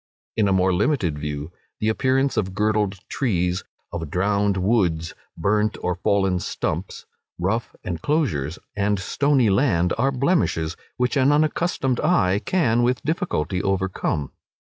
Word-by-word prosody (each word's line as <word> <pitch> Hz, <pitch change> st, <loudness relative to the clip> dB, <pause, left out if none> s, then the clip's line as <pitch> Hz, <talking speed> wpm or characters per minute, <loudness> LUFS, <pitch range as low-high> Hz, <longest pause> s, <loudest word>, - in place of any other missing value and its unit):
In 110 Hz, -3 st, +2 dB
a -, -, +2 dB
more 95 Hz, 0 st, +3 dB
limited 90 Hz, -, +1 dB
view, 75 Hz, +1 st, -4 dB, 0.3 s
the 110 Hz, -, 0 dB
appearance 130 Hz, +4 st, +1 dB
of 95 Hz, -4 st, -1 dB
girdled 105 Hz, -1 st, +1 dB
trees, 90 Hz, -8 st, 0 dB, 0.3 s
of 80 Hz, -3 st, -4 dB
drowned 100 Hz, +3 st, +1 dB
woods, 90 Hz, -6 st, +1 dB, 0.2 s
burnt 105 Hz, +5 st, +1 dB
or 90 Hz, -, -1 dB
fallen 95 Hz, +1 st, +1 dB
stumps, -, -, -4 dB, 0.3 s
rough 100 Hz, +7 st, -1 dB
enclosures, 85 Hz, -, -1 dB, 0.2 s
and 105 Hz, 0 st, +1 dB
stony 130 Hz, +4 st, +2 dB
land, 95 Hz, -6 st, +2 dB
are 135 Hz, +3 st, +3 dB
blemishes 130 Hz, -, +1 dB, 0.2 s
which 125 Hz, +3 st, 0 dB
an 135 Hz, +1 st, +4 dB
unaccustomed 150 Hz, -3 st, +1 dB
eye 95 Hz, +1 st, +2 dB
can 125 Hz, -11 st, +2 dB
with 125 Hz, +1 st, +1 dB
difficulty 145 Hz, -, -1 dB
overcome. 95 Hz, -7 st, -1 dB
100 Hz, 130 wpm, -23 LUFS, 90-125 Hz, 0.3 s, an